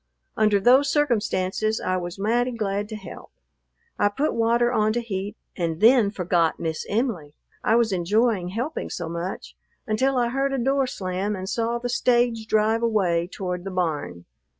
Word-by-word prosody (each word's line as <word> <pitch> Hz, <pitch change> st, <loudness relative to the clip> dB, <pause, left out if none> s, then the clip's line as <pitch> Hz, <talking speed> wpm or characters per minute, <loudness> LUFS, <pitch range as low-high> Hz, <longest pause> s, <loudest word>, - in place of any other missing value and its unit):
Under 215 Hz, -2 st, +3 dB
those 260 Hz, +7 st, +5 dB
circumstances 220 Hz, -6 st, 0 dB
I 185 Hz, -, -1 dB
was 175 Hz, 0 st, -5 dB
mighty 240 Hz, +5 st, 0 dB
glad 205 Hz, -2 st, -2 dB
to 220 Hz, -, -5 dB
help. 210 Hz, -, -10 dB, 0.7 s
I 205 Hz, -, +4 dB
put 280 Hz, +9 st, -1 dB
water 235 Hz, +1 st, +2 dB
on 215 Hz, -1 st, +2 dB
to 240 Hz, -, 0 dB
heat 205 Hz, -3 st, -5 dB, 0.2 s
and 165 Hz, -3 st, -2 dB
then 230 Hz, -1 st, +5 dB
forgot 175 Hz, -4 st, 0 dB
Miss 160 Hz, -1 st, -3 dB
Em'ly, 200 Hz, -, -2 dB, 0.3 s
I 225 Hz, -, +3 dB
was 230 Hz, -2 st, +3 dB
enjoying 195 Hz, +2 st, +1 dB
helping 235 Hz, -, -4 dB
so 170 Hz, -, -4 dB
much, 170 Hz, +3 st, -5 dB, 0.3 s
until 260 Hz, +4 st, +1 dB
I 240 Hz, -1 st, +2 dB
heard 275 Hz, +2 st, -1 dB
a -, -, 0 dB
door 270 Hz, +2 st, +1 dB
slam 190 Hz, -1 st, -3 dB
and 190 Hz, 0 st, -6 dB
saw 230 Hz, +3 st, -1 dB
the 240 Hz, +1 st, -4 dB
stage 240 Hz, -2 st, +1 dB
drive 220 Hz, +1 st, +2 dB
away 185 Hz, -7 st, +1 dB
toward 180 Hz, -2 st, -4 dB
the 195 Hz, -, -5 dB
barn. 155 Hz, -, -3 dB
215 Hz, 170 wpm, -24 LUFS, 185-240 Hz, 0.7 s, those